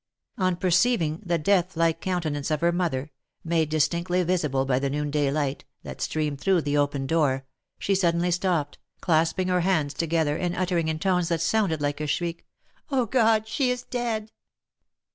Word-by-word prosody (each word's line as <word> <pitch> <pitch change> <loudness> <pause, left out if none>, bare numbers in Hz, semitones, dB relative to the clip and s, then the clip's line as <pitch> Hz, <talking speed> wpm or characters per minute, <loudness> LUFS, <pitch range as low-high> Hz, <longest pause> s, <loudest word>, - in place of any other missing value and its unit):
On 185 -1 +2
perceiving 175 -2 +2
the 175 -3 0
deathlike 165 -1 +1
countenance 160 -6 -2
of 155 -1 -1
her 170 0 +3
mother, 155 -5 -2 0.3
made 165 -2 +1
dis 155 -2 +3
tinctly 175 +1 -1
visible 150 -7 0
by 130 -1 +1
the 140 0 -1
noonday 145 0 0
light, 145 -1 -2 0.2
that - - -8
streamed 150 -3 -2
through 190 -3 +3
the 145 -1 -1
open 145 -1 0
door, 135 -3 +1 0.3
she 200 - 0
suddenly 175 -2 +2
stopped, 175 -5 -1 0.2
clasping 165 +2 +1
her 180 -1 +2
hands 160 -6 +1
together, 160 -3 0
and 175 -1 -2
uttering 175 -3 0
in 160 0 -1
tones 180 0 +1
that 170 -1 0
sounded 170 -4 +1
like 145 +1 -1
a 150 - -2
shriek 170 +3 -3
— - - -40
" - - -37
Oh! 260 -3 +2
God, 220 -2 +2
she 260 +3 0
is 250 0 -2
dead 225 -3 -3
170 Hz, 180 wpm, -25 LUFS, 150-185 Hz, 0.3 s, her